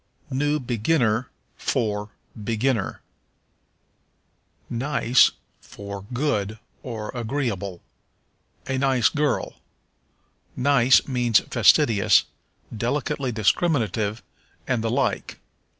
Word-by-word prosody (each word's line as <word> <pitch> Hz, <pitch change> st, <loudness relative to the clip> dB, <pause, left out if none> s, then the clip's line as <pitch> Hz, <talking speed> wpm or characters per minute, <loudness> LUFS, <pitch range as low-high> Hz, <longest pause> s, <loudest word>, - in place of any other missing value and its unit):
New 145 Hz, +3 st, 0 dB
Beginner 120 Hz, -1 st, 0 dB, 0.3 s
for 105 Hz, -5 st, -1 dB, 0.2 s
Beginner. 115 Hz, +1 st, -1 dB, 1.7 s
Nice 130 Hz, 0 st, +3 dB, 0.3 s
for 100 Hz, -1 st, -9 dB
Good, 110 Hz, -6 st, -1 dB, 0.2 s
or 110 Hz, -4 st, -6 dB
Agreeable. 115 Hz, -7 st, -3 dB, 0.8 s
"A 130 Hz, 0 st, -2 dB
nice 130 Hz, -4 st, +3 dB
girl." 150 Hz, -1 st, -1 dB, 1.0 s
Nice 130 Hz, -1 st, +4 dB
means 120 Hz, -4 st, +3 dB
fastidious, 105 Hz, -4 st, +4 dB, 0.5 s
delicately 130 Hz, +3 st, -2 dB
discriminative, 110 Hz, -, 0 dB, 0.4 s
and 125 Hz, -4 st, -1 dB
the 115 Hz, -, 0 dB
like. 125 Hz, +1 st, -1 dB
120 Hz, 75 wpm, -24 LUFS, 110-135 Hz, 1.7 s, Nice